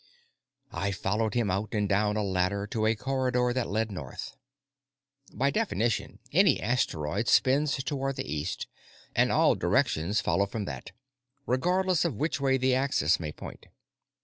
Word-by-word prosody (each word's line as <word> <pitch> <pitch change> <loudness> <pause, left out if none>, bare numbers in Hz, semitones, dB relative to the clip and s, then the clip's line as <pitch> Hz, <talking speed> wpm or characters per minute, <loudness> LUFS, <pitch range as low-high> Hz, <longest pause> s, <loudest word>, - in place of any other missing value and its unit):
I 100 0 -1
followed 105 +3 -1
him 115 -5 +1
out 100 +4 -2
and 105 -1 +1
down 105 +1 +1
a 105 - 0
ladder 95 +1 0
to 110 +1 -1
a 110 - +2
corridor 125 0 0
that 130 -2 -1
led 110 +1 -1
north. 85 - -7 1.0
By 140 +2 +1
definition, 120 - -1
any 180 -2 +4
asteroid 90 -11 -1
spins 140 +3 +3
toward 135 -1 -2
the - - -4
east, 75 +3 -3 0.5
and - - +3
all - - +4
directions 85 +8 +1
follow 100 0 +1
from 105 +1 -4
that, 65 -7 -7 0.5
regardless 180 +6 +1
of 165 -8 -1
which 150 0 -1
way 135 -1 +3
the 130 0 +2
axis 125 - +2
may 80 -3 -4
point. - - -10
110 Hz, 150 wpm, -28 LUFS, 100-135 Hz, 1.0 s, any